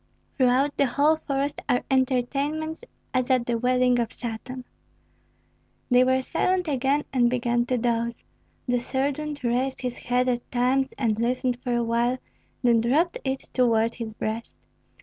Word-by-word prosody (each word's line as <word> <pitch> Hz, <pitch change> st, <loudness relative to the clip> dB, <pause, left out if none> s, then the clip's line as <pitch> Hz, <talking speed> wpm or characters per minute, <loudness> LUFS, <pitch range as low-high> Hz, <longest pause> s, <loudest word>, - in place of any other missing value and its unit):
"Throughout 260 Hz, +2 st, +2 dB
the 280 Hz, -, +3 dB
whole 290 Hz, +5 st, +3 dB
forest 280 Hz, -1 st, -2 dB
are 245 Hz, -, +2 dB
entertainments 280 Hz, -, 0 dB, 0.3 s
as 255 Hz, -1 st, +1 dB
if -, -, 0 dB
at -, -, -8 dB
the 240 Hz, -, 0 dB
wedding 250 Hz, 0 st, +3 dB
of 235 Hz, -, -1 dB
Satan." 250 Hz, +2 st, -6 dB, 1.3 s
They 250 Hz, 0 st, +6 dB
were 260 Hz, 0 st, +2 dB
silent 365 Hz, +5 st, 0 dB
again 275 Hz, +1 st, +1 dB
and 245 Hz, -2 st, +4 dB
began 240 Hz, -1 st, 0 dB
to 255 Hz, -, +1 dB
doze. 235 Hz, 0 st, -1 dB, 0.4 s
The 245 Hz, 0 st, +2 dB
sergeant 285 Hz, +3 st, -2 dB
raised 250 Hz, +2 st, 0 dB
his 250 Hz, -1 st, -4 dB
head 250 Hz, +1 st, 0 dB
at 245 Hz, -1 st, -1 dB
times 260 Hz, +2 st, +1 dB
and 225 Hz, -4 st, 0 dB
listened 250 Hz, +1 st, 0 dB
for 245 Hz, -2 st, -1 dB
a 240 Hz, -, +1 dB
while, 235 Hz, +2 st, +1 dB, 0.5 s
then 235 Hz, -2 st, +4 dB
dropped 300 Hz, +9 st, +1 dB
it 265 Hz, 0 st, -2 dB
toward 230 Hz, -2 st, +2 dB
his 225 Hz, -3 st, -6 dB
breast. 220 Hz, +2 st, -4 dB
250 Hz, 155 wpm, -25 LUFS, 240-270 Hz, 1.3 s, They